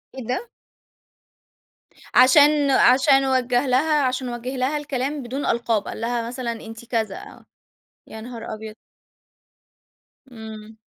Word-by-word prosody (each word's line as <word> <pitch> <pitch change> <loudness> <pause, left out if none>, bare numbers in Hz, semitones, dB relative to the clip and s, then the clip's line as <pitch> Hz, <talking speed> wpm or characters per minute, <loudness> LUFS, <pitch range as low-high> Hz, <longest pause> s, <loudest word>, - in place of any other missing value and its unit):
إيه 260 - -6
ده؟! 350 - -3 1.6
عشان 285 +2 +5
عشان 270 +2 +5
وجّه 255 0 +1
لها 295 +4 +2
عشان 255 0 -1
وجّه 240 +2 -5
لها 265 +4 0
الكلام 285 0 -3
بدون 260 +4 -4
ألقاب. 230 -3 0
قال - - -7
لها 235 0 -2
مثلًا 245 -1 -4
أنتِ 225 0 -9
كذا، 220 -4 -2
آه. - - -13 0.6
يا 220 - -9
نهار 230 -1 -7
أبيض! 215 0 -8 1.6
إمم. 220 -1 -10
250 Hz, 120 wpm, -22 LUFS, 230-270 Hz, 1.6 s, عشان